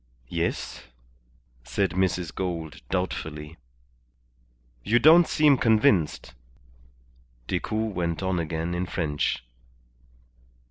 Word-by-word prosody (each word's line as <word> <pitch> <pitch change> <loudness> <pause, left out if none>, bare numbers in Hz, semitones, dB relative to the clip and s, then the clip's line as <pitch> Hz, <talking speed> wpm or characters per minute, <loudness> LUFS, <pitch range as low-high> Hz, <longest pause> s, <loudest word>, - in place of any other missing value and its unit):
"Yes," 85 -5 -3 0.8
said 95 +10 -1
Mrs. 90 -2 -1
Gould, 85 -4 -4
doubtfully. 80 -4 -4 1.3
"You 115 - +3
don't 160 +7 +7
seem 150 -4 +4
convinced," 105 - +2 1.1
Decoud 110 - -2
went 85 0 -2
on 95 -2 0
again 80 +1 -3
in 90 +1 -2
French. 75 -8 -1
90 Hz, 85 wpm, -26 LUFS, 80-105 Hz, 1.3 s, don't